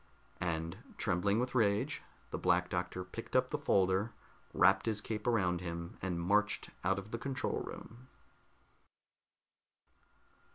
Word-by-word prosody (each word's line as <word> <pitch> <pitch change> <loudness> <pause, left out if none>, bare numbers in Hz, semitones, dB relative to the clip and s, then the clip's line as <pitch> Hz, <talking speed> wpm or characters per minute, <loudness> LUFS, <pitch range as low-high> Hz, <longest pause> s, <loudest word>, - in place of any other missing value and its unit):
And 85 -1 -2 0.2
trembling 100 +5 +2
with 125 +1 -1
rage, 105 -4 +2 0.3
the - - -2
Black - - +2
Doctor 90 - -2
picked 90 - -8
up - - +3
the - - +1
folder, 95 +3 +2 0.4
wrapped 95 +3 +4
his 110 -2 +1
cape 105 +1 -4
around 90 -7 +2
him, 85 -1 -5
and 90 -2 -1
marched 105 +5 +1
out 95 +2 +2
of 100 +2 -6
the 115 - -3
control 135 +2 -1
room. 120 +3 -9
100 Hz, 130 wpm, -34 LUFS, 90-110 Hz, 0.4 s, wrapped